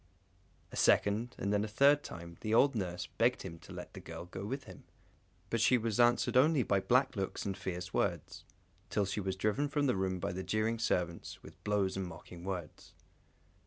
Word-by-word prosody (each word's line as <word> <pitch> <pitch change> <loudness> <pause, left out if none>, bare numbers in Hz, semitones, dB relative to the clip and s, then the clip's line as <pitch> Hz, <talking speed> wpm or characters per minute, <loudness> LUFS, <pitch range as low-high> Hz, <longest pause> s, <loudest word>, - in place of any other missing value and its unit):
A - - -8
second, 110 +5 +3
and 100 +1 -1
then 105 0 +2
a - - -2
third 140 +6 +5
time, 85 0 -8
the 110 0 +1
old 140 +4 +5
nurse 90 -5 -3
begged 115 +10 +1
him 85 -3 -7
to - - -14
let - - -8
the - - -8
girl - - -8
go 95 +2 -7
with 135 +7 -4
him, - - -12 0.7
but 115 - +1
she 125 +2 +5
was 115 -1 -2
answered 120 +1 +4
only 140 +1 +5
by 100 -1 +2
black 130 +5 +2
looks 95 -2 -3
and 100 -1 -2
fierce 90 -2 -5
words, - - -1 0.5
till 105 -2 +1
she 95 +2 -2
was 95 -1 -2
driven 105 +9 0
from 145 0 +1
the 125 - +2
room 95 -1 -1
by - - -2
the 95 +1 -4
jeering 110 +4 0
servants, 85 -6 -2
with - - -14
blows 100 -2 +1
and 95 -1 -2
mocking 85 +1 -10
words. 90 -4 -6
100 Hz, 200 wpm, -33 LUFS, 95-120 Hz, 0.7 s, third